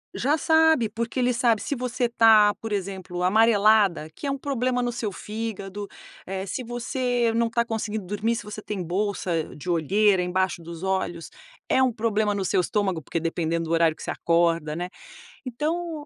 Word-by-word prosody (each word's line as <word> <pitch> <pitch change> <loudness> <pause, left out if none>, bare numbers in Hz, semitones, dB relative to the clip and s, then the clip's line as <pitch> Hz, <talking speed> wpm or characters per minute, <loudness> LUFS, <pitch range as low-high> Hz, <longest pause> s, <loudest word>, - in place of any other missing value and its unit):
Já 290 +5 +1
sabe, 320 -7 +4
porque 230 +4 -3
ele 250 0 +2
sabe 235 -3 +2
se 285 - -2
você 250 -1 -1
tá, 220 -3 +6
por 225 - -5
exemplo, 190 -3 -4
amarelada, 210 -4 +4
que - - -8
é 275 - 0
um 275 - -2
problema 255 -2 -1
no 245 - -1
seu 225 -4 -3
fígado, 205 -1 -5 0.4
eh, 190 0 -4
se 200 +7 -4
você 240 0 -1
não 230 0 +2
tá 235 +1 0
conseguindo 220 -3 -3
dormir, 210 +4 -1
se - - -6
você 210 +1 -7
tem 205 -3 -4
bolsa 180 -2 -2
de 150 +5 -8
olheiras 185 +3 +3
embaixo 185 -1 -1
dos 170 0 -9
olhos, 190 -3 -2 0.4
é 260 - +3
um 255 - +3
problema 215 -2 0
no 200 -1 -2
seu 180 - +2
estômago, 190 -3 -1
porque 165 - -3
dependendo 165 0 -1
do 160 - -5
horário 165 -1 +3
que - - -13
você - - -6
acorda, 165 -2 +1
né. 180 +1 -4 0.6
Então, 310 +4 -3
210 Hz, 185 wpm, -25 LUFS, 180-235 Hz, 0.6 s, tá